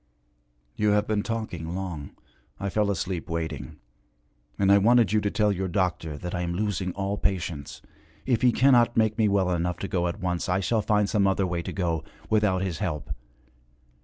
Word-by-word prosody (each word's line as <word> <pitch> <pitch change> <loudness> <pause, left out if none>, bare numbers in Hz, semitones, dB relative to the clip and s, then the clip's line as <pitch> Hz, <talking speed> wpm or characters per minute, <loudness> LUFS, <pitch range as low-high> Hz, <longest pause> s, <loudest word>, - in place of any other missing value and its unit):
'You 105 -1 +2
have 105 0 +2
been 105 -1 0
talking 90 -8 -4
long 85 -7 -5 0.4
I 100 +1 -2
fell 105 0 +1
asleep 90 -3 -3
waiting. 80 -2 -4 0.8
And 100 0 +3
I 100 - +7
wanted 115 -1 +4
you 110 - +3
to 105 - 0
tell 105 0 +2
your 95 -1 -2
doctor 85 -5 -1
that 90 +3 -6
I 90 - -1
am 85 0 -2
losing 100 -2 -1
all 100 +1 -2
patience. 85 -7 -3 0.4
If 120 -4 +1
he 125 - +5
cannot 120 -2 +4
make 110 0 +2
me 110 - +4
well 100 -2 +2
enough 90 0 -1
to 100 - -4
go 90 -3 0
at 85 - -4
once, 90 0 -2
I 90 +1 +2
shall 110 +3 +1
find 105 -1 +2
some 100 -1 +2
other 95 0 +1
way 90 -1 -2
to - - -5
go 85 -4 -1 0.3
without 105 -4 +2
his 90 -5 -3
help. 75 -5 -3
95 Hz, 190 wpm, -26 LUFS, 85-105 Hz, 0.8 s, I